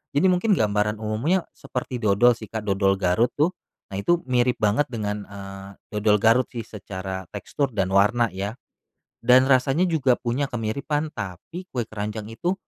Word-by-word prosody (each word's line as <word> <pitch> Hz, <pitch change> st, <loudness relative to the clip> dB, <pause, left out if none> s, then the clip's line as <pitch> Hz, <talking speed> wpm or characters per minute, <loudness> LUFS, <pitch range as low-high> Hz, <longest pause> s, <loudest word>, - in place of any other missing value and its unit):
Jadi 170 Hz, +7 st, +4 dB
mungkin 180 Hz, +5 st, +1 dB
gambaran 105 Hz, -1 st, +1 dB
umumnya, 125 Hz, -, 0 dB
seperti 125 Hz, 0 st, -5 dB
dodol 110 Hz, +3 st, +5 dB
sih, 110 Hz, -, -8 dB
Kak, 110 Hz, 0 st, -4 dB
dodol 95 Hz, -1 st, +2 dB
Garut 100 Hz, +6 st, +2 dB
tuh, 155 Hz, +5 st, +2 dB, 0.4 s
nah 95 Hz, -, -4 dB
itu 175 Hz, +11 st, +2 dB
mirip 125 Hz, 0 st, +3 dB
banget 110 Hz, +8 st, +2 dB
dengan, 105 Hz, -3 st, -3 dB
eee, 95 Hz, -1 st, -9 dB, 0.3 s
dodol 105 Hz, 0 st, +4 dB
Garut 115 Hz, +3 st, +5 dB
sih 115 Hz, -2 st, -4 dB
secara 95 Hz, -3 st, -6 dB
tekstur 140 Hz, -3 st, -2 dB
dan 95 Hz, -3 st, +1 dB
warna 110 Hz, +4 st, +4 dB
ya. 100 Hz, +4 st, -4 dB, 0.7 s
Dan 125 Hz, +2 st, +6 dB
rasanya 135 Hz, +6 st, +3 dB
juga 140 Hz, -6 st, +3 dB
punya 125 Hz, +4 st, -1 dB
kemiripan, 140 Hz, +7 st, -2 dB
tapi 110 Hz, -, -7 dB
kue 125 Hz, -, -1 dB
keranjang 105 Hz, 0 st, -5 dB
itu, 175 Hz, +11 st, -1 dB
110 Hz, 160 wpm, -24 LUFS, 105-130 Hz, 0.7 s, Dan